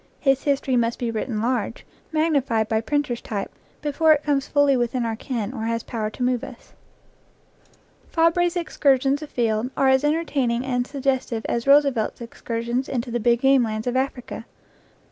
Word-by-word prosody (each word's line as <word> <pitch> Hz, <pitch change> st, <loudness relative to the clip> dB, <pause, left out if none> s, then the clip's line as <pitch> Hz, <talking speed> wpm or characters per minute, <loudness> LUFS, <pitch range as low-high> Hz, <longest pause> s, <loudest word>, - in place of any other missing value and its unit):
His 270 Hz, -2 st, +2 dB
his 280 Hz, -2 st, +2 dB
tory 260 Hz, -2 st, -1 dB
must 235 Hz, 0 st, +1 dB
be 235 Hz, -2 st, -2 dB
written 220 Hz, 0 st, -3 dB
large, 240 Hz, -1 st, -2 dB, 0.3 s
magnified 280 Hz, -9 st, +1 dB
by 220 Hz, 0 st, +1 dB
printer's 290 Hz, -2 st, -1 dB
type, 200 Hz, -3 st, -4 dB, 0.3 s
before 310 Hz, +2 st, +4 dB
it 300 Hz, -1 st, -1 dB
comes 285 Hz, -2 st, 0 dB
fully 285 Hz, -2 st, +3 dB
within 240 Hz, 0 st, 0 dB
our 225 Hz, -1 st, -2 dB
ken 230 Hz, -1 st, -4 dB
or 225 Hz, -4 st, -4 dB
has 230 Hz, 0 st, -1 dB
power 220 Hz, -2 st, -3 dB
to 245 Hz, -, -5 dB
move 250 Hz, 0 st, +1 dB
us. 265 Hz, -3 st, -11 dB, 1.4 s
Fabre's 335 Hz, +2 st, +2 dB
excursions 280 Hz, -4 st, +1 dB
afield 240 Hz, -5 st, -1 dB
are 270 Hz, -, +4 dB
as 265 Hz, +1 st, +4 dB
entertaining 285 Hz, -6 st, 0 dB
and 245 Hz, -1 st, -1 dB
suggestive 260 Hz, -5 st, -2 dB
as 235 Hz, +2 st, -2 dB
Roosevelt's 275 Hz, -5 st, +3 dB
excursions 235 Hz, +2 st, -3 dB
into 245 Hz, -2 st, -3 dB
the 240 Hz, -, -1 dB
big 235 Hz, +1 st, +2 dB
game 270 Hz, -1 st, +5 dB
lands 215 Hz, -2 st, -2 dB
of 245 Hz, 0 st, -1 dB
Africa. 260 Hz, -3 st, -3 dB
255 Hz, 165 wpm, -23 LUFS, 230-280 Hz, 1.4 s, game